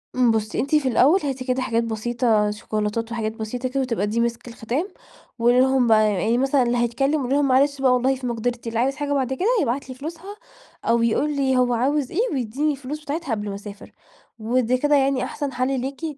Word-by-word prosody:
إمم، 245 -2 +4
بُصّي، 215 -1 -1
أنتِ 285 +4 +1
في 285 -3 +2
الأول 280 +10 +4
هاتي 265 -2 -3
كده 255 0 0
حاجات 230 -2 0
بسيطة 225 -1 0
شيكولاتات 215 +2 -3
وحاجات 220 -2 -2
بسيطة 245 +3 -4
كده، 270 +1 -1
وتبقى 230 -5 -1
دي 225 +3 -1
مِسك 235 +1 -2
الختام، 240 - -3 0.5
وقولي 240 +2 +4
لهم 260 -2 +3
بقى 215 -2 +4
يعني 220 +6 +1
مثلًا 270 0 +2
اللي 240 0 0
هيتكلم 270 +5 0
قولي 260 +2 0
لهم: 285 -1 +2
"معلش 275 +1 +2
بقى 255 -2 +4
والله 260 +2 +2
في 255 -1 -5
مقدرتي، 235 0 -3
اللي 230 0 -2
عايز 270 +3 +1
حاجة 290 -1 -2
بعد 265 -2 0
كده 365 +10 -1
يبعت 260 +3 -2
لي 255 - -7
فلوسها، 335 +8 -8 0.5
أو 230 0 +2
يقول 290 +6 +1
لي 265 -2 +1
هو 245 -1 +2
عاوز 270 +3 0
إيه 360 - -2
ويدّيني 265 +4 -1
الفلوس 285 +2 -6
بتاعتها 295 -2 -4
قبل 205 -2 -2
ما 195 - -4
أسافر" 200 0 -10 0.5
ودي 245 +2 +1
كده 295 +2 +2
يعني 270 -2 +2
أحسن 285 -2 -4
حَل 255 +1 0
ليكِ 275 +4 -6
255 Hz, 210 wpm, -22 LUFS, 230-275 Hz, 0.5 s, إمم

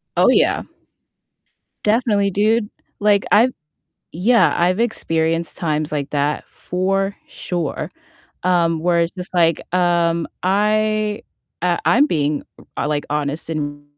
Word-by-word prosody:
Oh - - +4
yeah. - - +3 1.2
Definitely, 210 -3 +2
dude. 210 +2 +1 0.3
Like 205 -1 +3
I've 235 +5 +5 0.6
yeah, 225 +9 +3
I've 180 +5 +2
experienced 165 -7 0
times 155 -2 -2
like 145 -1 -2
that 145 +1 -1
for 195 +2 -1
sure. 175 -5 -4 0.5
Um, 170 -3 +2
where 170 0 +2
it's 170 - 0
just 185 -1 -7
like, 165 -2 +3
um 170 -2 +2 0.2
I, 210 +2 +1 0.4
uh, 175 -1 +1
I'm 285 +5 +4
being, 150 - 0 0.3
uh, - - -1
like 150 -1 -1
honest 150 +2 -2
and 145 -2 -4
175 Hz, 120 wpm, -20 LUFS, 160-205 Hz, 1.2 s, I've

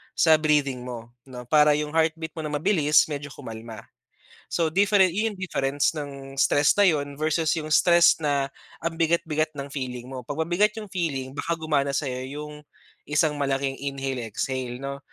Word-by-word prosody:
sa 160 -1 +5
breathing 145 -5 +1
mo, 120 -2 -7 0.2
'no, 125 -2 -8
para 150 -1 +5
yung 150 0 -2
heartbeat 160 0 +1
mo - - -2
na 150 - -4
mabilis 150 -2 +3
medyo 145 -1 -5
kumalma. 110 -1 -9 0.7
So 165 -2 +1
different 200 0 +4
'yon 215 +2 0
yung - - -16
difference 140 -6 0
ng 140 -2 -7
stress 145 +1 +4
na 205 - +6
'yon 145 -4 -1
versus 155 0 +1
yung 155 0 -5
stress 170 -1 +5
na 140 -2 +1 0.3
ang 165 0 -2
bigat-bigat 160 -2 +1
ng 140 -1 -6
feeling 125 -3 -5
mo. 130 -1 -6
Pag 145 +3 -4
mabigat 205 +5 +2
yung 210 -1 -7
feeling, 145 -8 -2
baka 165 +4 -1
gumana 145 -3 0
sayo 130 -4 -2
yung 150 +2 -8 0.4
isang 150 +1 +2
malaking 135 -1 -1
inhale 135 -3 -4
exhale, 125 +2 -3
'no? 140 0 -4
145 Hz, 170 wpm, -25 LUFS, 135-160 Hz, 0.7 s, na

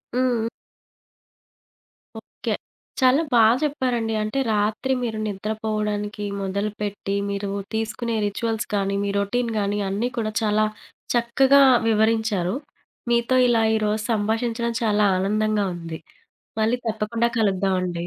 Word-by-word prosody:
హ్మ్. 245 -3 +1 1.7
ఓకే. - - -5 0.5
చాలా 260 +4 +5
బా 235 - +6 0.2
చెప్పారండి. 250 -6 0
అంటే, 215 +6 -2
రాత్రి 215 +5 0
మీరు 225 -2 -2
నిద్రపోవడానికి 210 0 -3 0.2
మొదలుపెట్టి, 200 0 -3
మీరు 200 0 -3 0.2
తీసుకునే 225 +1 -2
రిచ్యువల్స్ 225 +2 -2
కానీ, 200 0 0
మీ 200 - -1
రొటీన్ 230 +4 -1
గాని, 205 +1 -1
అన్నీ 215 +6 -1
కూడా 215 -2 -1
చాలా 215 0 +2 0.5
చక్కగా 265 +4 +4 0.3
వివరించారు. 220 -3 +1 0.6
మీతో 235 +2 +2
ఇలా 230 -2 +3
ఈరోజు 215 0 0
సంభాషించడం 225 +2 0
చాలా 210 -1 +2
ఆనందంగా 210 +2 +1
ఉంది. 165 -2 -7 0.6
మళ్ళీ 225 +3 +2
తప్పకుండా 225 +1 0
కలుద్దామండి. 185 -4 0
215 Hz, 105 wpm, -23 LUFS, 205-230 Hz, 1.7 s, బా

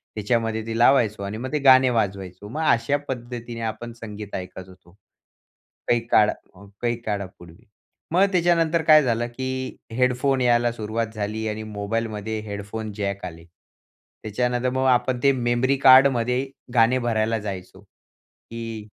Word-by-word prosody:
त्याच्यामध्ये 110 +1 -1
ते 115 - -3
लावायचो 115 -5 +3
आणि 100 +2 -5
मग 130 +3 -5
ते 150 - +1
गाणे 130 -2 +6
वाजवायचो. 100 -4 -3
मग 155 +7 -4
अशा 115 +5 +1
पद्धतीने 120 -2 -6
आपण 120 +2 -9
संगीत 105 -2 -7
ऐकत 95 0 -7
होतो, 95 - -18 1.0
काही 120 - +3
काळ 105 -3 +4 0.2
अ, 95 +2 -15 0.2
काही 120 0 0
काळापूर्वी. 100 -3 -6 0.5
मग 185 +4 +4
त्याच्यानंतर 170 -2 +2
काय 155 -1 +7
झालं 120 -1 0
की 130 0 -4 0.2
हेडफोन 125 +2 +1
यायला 120 -1 +3
सुरुवात 115 0 -3
झाली 110 +1 -3
आणि 110 +1 -5
मोबाईलमध्ये 110 +1 -3
हेडफोन 105 +1 -6
जॅक 100 -2 -3
आले. 85 -2 -9 0.8
त्याच्यानंतर 125 +3 -1
मग 130 +1 -1
आपण 125 0 +2
ते 140 - +6
मेमरी 120 +2 +1
कार्डमध्ये 130 -1 +5 0.3
गाणे 120 +1 +4
भरायला 115 -1 0
जायचो 95 -2 -7
की 115 +2 -11
115 Hz, 140 wpm, -23 LUFS, 105-125 Hz, 1.0 s, काय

